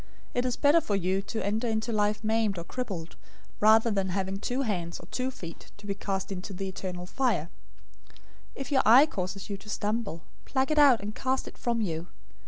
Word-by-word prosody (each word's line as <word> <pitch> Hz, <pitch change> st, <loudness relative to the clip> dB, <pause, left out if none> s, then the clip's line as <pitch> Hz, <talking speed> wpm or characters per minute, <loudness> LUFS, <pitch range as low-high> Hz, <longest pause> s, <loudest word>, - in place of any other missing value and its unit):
It 245 Hz, 0 st, +1 dB
is 250 Hz, -, 0 dB
better 300 Hz, +3 st, +5 dB
for 205 Hz, -, -1 dB
you 190 Hz, 0 st, +1 dB
to 220 Hz, +2 st, -4 dB
enter 220 Hz, +4 st, 0 dB
into 220 Hz, +1 st, -1 dB
life 210 Hz, 0 st, +1 dB
maimed 220 Hz, -2 st, +1 dB
or 170 Hz, -, -4 dB
crippled, 185 Hz, -6 st, -5 dB, 0.4 s
rather 220 Hz, +2 st, +6 dB
than 195 Hz, -2 st, 0 dB
having 190 Hz, +1 st, -2 dB
two 250 Hz, +5 st, -1 dB
hands 175 Hz, -7 st, -2 dB
or -, -, -11 dB
two 255 Hz, 0 st, -1 dB
feet 170 Hz, -10 st, -10 dB
to 205 Hz, -, -14 dB
be 200 Hz, -, -1 dB
cast 195 Hz, 0 st, -3 dB
into 195 Hz, +1 st, -5 dB
the 195 Hz, +1 st, -4 dB
eternal 180 Hz, -1 st, -5 dB
fire. 215 Hz, -, 0 dB, 0.6 s
018:009 -, -, -22 dB, 0.4 s
If 275 Hz, +2 st, -6 dB
your 265 Hz, -, +5 dB
eye 250 Hz, +6 st, +8 dB
causes 195 Hz, -, -4 dB
you 200 Hz, -, -2 dB
to 210 Hz, -, -14 dB
stumble, 210 Hz, -5 st, -2 dB, 0.2 s
pluck 265 Hz, +2 st, 0 dB
it 305 Hz, -, +3 dB
out, 270 Hz, -7 st, +7 dB
and 210 Hz, +1 st, -5 dB
cast 260 Hz, +3 st, -1 dB
it -, -, -9 dB
from 235 Hz, -1 st, -1 dB
you. 165 Hz, -4 st, -2 dB
210 Hz, 205 wpm, -28 LUFS, 190-240 Hz, 0.6 s, eye